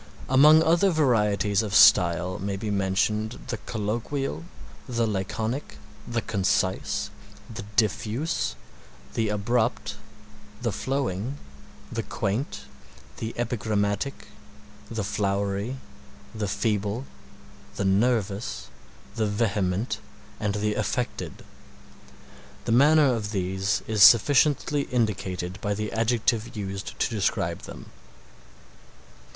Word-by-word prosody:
Among 150 +4 +7
other 170 +5 +4
varieties 105 - +2
of 105 -2 -3
style 90 -2 +5
may 100 0 -3
be 105 +1 -3
mentioned 105 +3 0
the - - -2
colloquial, 110 - -3 0.4
the 115 -2 +1
laconic, 110 +6 -3 0.3
the 120 -1 -2
concise, 95 -2 0 0.4
the 110 - -7
diffuse, 110 - 0 0.6
the 110 -2 0
abrupt 110 +1 0 0.6
the 120 -1 -1
flowing, 130 +1 -2 0.5
the - - -2
quaint, 105 0 -3 0.6
the 115 0 -5
epigrammatic, 110 0 -1 0.6
the 110 -2 -3
flowery, 100 +4 -1 0.6
the 110 -2 -2
feeble, 105 +4 -1 0.7
the 100 - -2
nervous, 100 +1 0 0.5
the 110 -1 +1
vehement, 105 0 0 0.4
and 105 -1 -1
the 105 0 0
affected. 115 +4 -3 1.2
The - - -1
manner 145 +2 +5
of 110 -3 -3
these 95 0 -1
is 110 -2 -1
sufficiently 145 +6 +5
indicated 95 -6 -2
by 105 0 -1
the 105 +1 -3
adjective 115 0 0
used 100 -1 -5
to - - +1
describe 105 -4 0
them. - - -10
105 Hz, 100 wpm, -26 LUFS, 100-120 Hz, 1.2 s, Among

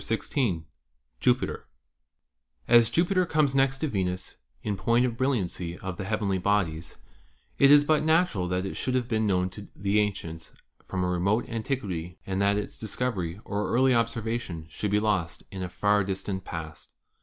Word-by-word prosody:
CHAPTER 115 - 0
XVI 105 - -1 0.6
JUPITER - - +1 1.0
As 120 -1 +6
Jupiter 180 +1 +2
comes 150 -4 +2
next 135 0 +3
to 155 - -1
Venus 95 -6 -3 0.3
in 105 -2 -1
point 115 +6 +2
of 120 -2 -2
brilliancy 95 -9 -1
of 95 -2 -6
the 95 - -4
heavenly 100 -2 0
bodies, 90 -5 0 0.6
it 140 - +7
is 145 0 +8
but 155 0 +3
natural 160 - +2
that 90 +1 -1
it 95 - -4
should 130 - -1
have 125 -2 0
been 110 -3 +1
known 90 -1 +1
to 100 +2 -9
the 100 +1 +1
ancients 85 -6 -3 0.3
from 95 -1 -2
a - - +1
remote 95 +5 +1
antiquity 105 - -3
and 95 0 -1
that 100 0 +3
its 105 - -5
discovery 100 -5 -2
or 100 -1 -2
early 130 +2 +4
observation 115 -7 -1
should 105 - -2
be 105 +1 +3
lost 100 -6 -1
in 95 - -6
a 90 - -3
far 105 +2 +2
distant 95 0 -3
past. 80 -2 -8
105 Hz, 170 wpm, -27 LUFS, 90-120 Hz, 1.0 s, is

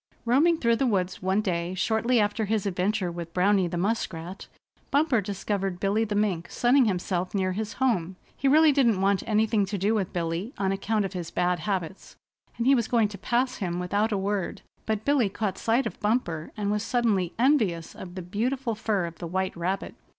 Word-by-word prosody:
Roaming 300 +8 +4
through 235 -5 +2
the 265 - +1
woods 185 -5 -1
one 190 +3 +1
day 175 -3 -2
shortly 225 +5 +1
after 210 +1 +1
his 215 -1 -1
adventure 190 0 0
with 170 -1 -7
Browny 190 0 +3
the 175 0 -4
Muskrat, 185 -3 -3 0.4
Bumper 285 -5 +2
discovered 195 -1 -3
Billy 205 +3 +1
the 205 -1 -3
Mink 195 -5 0
sunning 250 +2 +3
himself 185 -2 -1
near 190 -1 +1
his 215 +3 -3
home. 190 -9 0 0.2
He 275 - -1
really 310 +3 +6
didn't 240 -8 +3
want 195 0 +2
anything 215 -1 +2
to 200 +1 -3
do 200 +4 +1
with 200 -4 -1
Billy 175 - -3
on 195 -1 0
account 205 +2 0
of 195 - -5
his 175 -3 -5
bad 180 0 0
habits, 190 -1 -4 0.4
and 235 - -1
he 270 - +6
was 235 -5 +2
going 230 -4 +2
to 205 - -8
pass 250 +5 0
him 175 -3 -2
without 205 +5 0
a 205 - +1
word; 195 -1 -2 0.2
but 220 -1 -1
Billy 280 -7 +3
caught 195 -1 -3
sight 235 +4 +1
of - - -5
Bumper, 210 -8 -1
and 205 -1 -1
was 210 0 0
suddenly 220 -7 0
envious 220 - +2
of 180 -1 -9
the 185 - -5
beautiful 235 +7 -1
fur 210 -4 -1
of 170 -1 -8
the 170 - -5
white 190 +2 -2
rabbit. 180 +3 -3
205 Hz, 200 wpm, -26 LUFS, 185-225 Hz, 0.4 s, really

